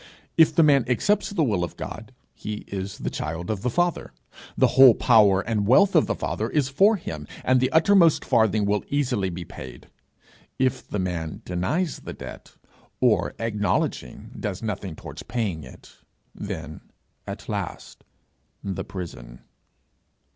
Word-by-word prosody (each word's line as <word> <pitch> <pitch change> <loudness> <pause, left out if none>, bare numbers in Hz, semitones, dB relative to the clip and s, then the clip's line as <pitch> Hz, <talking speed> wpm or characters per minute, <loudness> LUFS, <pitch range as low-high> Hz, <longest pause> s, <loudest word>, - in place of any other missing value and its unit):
If 160 -1 +5
the 165 - +6
man 140 -4 +5
accepts 205 - +1
the 195 -6 0
will 105 -10 0
of 85 - -6
God, - - -7 0.2
he 105 0 -6
is 95 0 -5
the - - -4
child 80 +5 -4
of 100 -3 -3
the 125 - 0
Father, 175 +7 -1 0.4
the - - +4
whole 130 -4 +8
power 105 -5 +5
and 105 -1 -1
wealth 190 - +5
of 160 - +5
the - - -1
Father - - -3
is 145 -4 0
for 195 +11 +4
him, 75 - -7 0.2
and 130 0 +3
the 130 +1 +1
uttermost 165 0 +4
farthing 110 -2 +2
will 100 0 0
easily 125 -9 0
be 85 0 -6
paid. 65 -5 -11 0.7
If 130 -1 0
the - - -4
man 85 -4 -4
denies 135 - -1
the - - -8
debt, - - -11 0.4
or - - +2
acknowledging 105 - -2
does 100 0 -4
nothing 100 -5 -4
towards - - -9
paying 100 -10 -3
it, 65 - -14 0.4
then 75 +3 -7 0.5
at - - -7
last - - -5 0.6
the 95 -2 -3
prison! 60 -10 -8
110 Hz, 155 wpm, -24 LUFS, 90-140 Hz, 0.7 s, whole